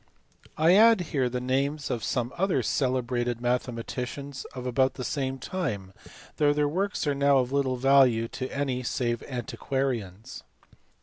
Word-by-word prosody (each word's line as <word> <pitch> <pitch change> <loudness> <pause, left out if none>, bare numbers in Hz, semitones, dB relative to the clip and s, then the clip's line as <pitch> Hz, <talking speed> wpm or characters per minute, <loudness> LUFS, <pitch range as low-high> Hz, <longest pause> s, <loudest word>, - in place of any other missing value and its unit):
I 160 +3 +5
add 220 0 +6
here 130 -4 +1
the 125 +1 -2
names 140 +4 -1
of 115 - -2
some 125 0 -1
other 190 +1 +1
celebrated 125 -2 0
mathema 120 -1 -1
ticians 135 +3 -6
of 125 -1 -6
about 130 +1 +1
the 130 - -5
same 135 -1 -2
time, 125 - -4 0.4
though 145 -2 +4
their 150 0 +1
works 195 +6 -1
are 145 - +1
now 140 0 +3
of 125 -1 0
little 135 -2 0
value 130 -3 +4
to 130 0 -5
any 135 -3 -1
save 120 -1 -1
antiquarians. 120 -5 -3
130 Hz, 150 wpm, -27 LUFS, 125-140 Hz, 0.4 s, add